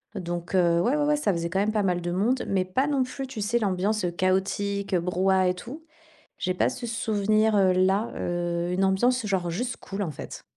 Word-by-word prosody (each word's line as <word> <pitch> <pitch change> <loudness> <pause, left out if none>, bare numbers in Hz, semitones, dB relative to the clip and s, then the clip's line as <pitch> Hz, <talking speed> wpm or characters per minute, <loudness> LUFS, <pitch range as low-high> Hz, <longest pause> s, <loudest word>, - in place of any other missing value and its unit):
Donc, 175 -1 -4
heu, 170 -2 +3
ouais, 250 +10 +2
ouais, 295 - +1
ouais, 300 0 +3
ça 215 -9 +1
faisait 170 0 -3
quand 190 - 0
même 210 +2 +1
pas 215 -1 0
mal 180 -2 0
de 175 - -3
monde, 220 +9 0
mais 190 -2 +1
pas 255 +10 0
non 280 -3 +1
plus, 265 +1 -6
tu 230 -5 -6
sais, 235 +4 +1
l'ambiance, 200 0 0
heu, 175 - +1
chaotique, 190 +2 0
heu, 175 - +2
brouhaha 185 +1 +2
et - - +1
tout. 250 - -9 0.5
J'ai 185 - -1
pas - - +1
ce 240 - -6
souvenir, 215 -1 +1
heu, 190 -2 +4
là. 190 +4 +2
Heu, 175 0 -2
une 185 +2 +1
ambiance 240 +6 +2
genre 190 -4 -1
juste 240 +9 -3
cool, 200 +1 -5
en 165 - -3
fait. 140 - -9
195 Hz, 225 wpm, -26 LUFS, 180-220 Hz, 0.5 s, heu